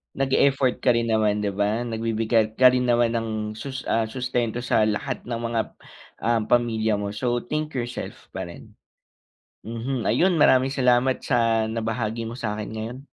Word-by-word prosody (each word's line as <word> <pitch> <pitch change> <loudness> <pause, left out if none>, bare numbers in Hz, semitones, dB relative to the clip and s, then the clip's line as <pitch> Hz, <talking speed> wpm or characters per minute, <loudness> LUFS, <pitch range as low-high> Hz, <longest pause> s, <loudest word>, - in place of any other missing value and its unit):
nag-e-effort 135 -1 +2
ka 125 - +5
rin 115 0 0
naman, 110 -2 +2
di 100 - +1
ba? 105 +4 0
Nagbibigay 110 -1 0
ka 130 - +9
rin 125 0 +1
naman 120 -1 +2
ng 115 -1 -1 0.3
sus 135 +4 -6
ah, 115 0 +2
sustento 120 -1 -2
sa 110 - +2
lahat 110 +5 -2
ng 120 -1 -3
mga, 115 -1 -1 0.6
um, 115 +1 +1
pamilya 110 -3 +2
mo. 100 0 -4
So, 120 +2 0
think 150 +5 -3
yourself 120 -1 -5
pa - - -3
rin. 85 - -13 0.9
Mhm. 115 +2 -3
Ayun, 175 - +3
maraming 130 -2 +5
salamat 125 0 +3
sa 115 -3 +2
nabahagi 115 0 -2
mo 115 - -6
sa'kin 105 -2 -4
ngayon. 115 +4 -6
115 Hz, 160 wpm, -24 LUFS, 110-125 Hz, 0.9 s, ka